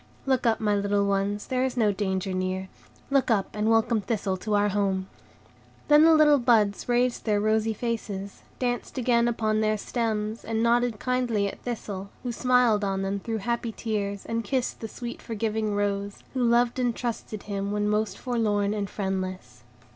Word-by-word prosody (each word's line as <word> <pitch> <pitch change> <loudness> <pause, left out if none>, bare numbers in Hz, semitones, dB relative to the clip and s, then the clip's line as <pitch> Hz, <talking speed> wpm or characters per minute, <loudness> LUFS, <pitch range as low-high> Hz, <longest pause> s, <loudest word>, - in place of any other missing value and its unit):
Look 260 -3 +2
up, 225 - +2
my 210 -2 +1
little 200 0 +1
ones, 200 +1 0
there 255 0 0
is 260 -1 -2
no 215 -3 +3
danger 190 -1 -2
near; 185 +1 -2 0.4
look 275 -2 +3
up, 205 -4 +2
and 210 +1 +1
welcome 225 0 +3
Thistle 200 -3 -1
to 210 +3 -1
our 205 0 +3
home." 195 -2 0 0.8
Then 300 +1 +7
the 325 -1 +7
little 300 -2 +6
buds 225 -3 +2
raised 245 0 +1
their 210 -2 +2
rosy 220 +1 +1
faces, 205 -4 -4 0.2
danced 245 +1 -2
again 235 -1 +3
upon 220 -2 0
their 215 0 +1
stems, 220 0 -2
and 225 0 -1
nodded 235 -1 +2
kindly 245 -5 0
at - - -7
Thistle, 200 -5 -5
who 245 - -2
smiled 245 -3 +3
on 195 -1 -1
them 195 +1 -1
through 225 +2 -3
happy 235 -1 -1
tears, 205 -3 -3
and 230 0 -2
kissed 255 +3 -1
the 225 - -5
sweet, 240 +2 -7
forgiving 220 -1 -2
rose, 200 0 -2
who 255 -2 0
loved 240 +1 +3
and 245 -2 +1
trusted 225 -3 -4
him 200 -1 -3
when 210 0 0
most 210 0 0
forlorn 210 -4 0
and 205 -2 -3
friendless. 185 - -4
215 Hz, 175 wpm, -26 LUFS, 200-240 Hz, 0.8 s, Then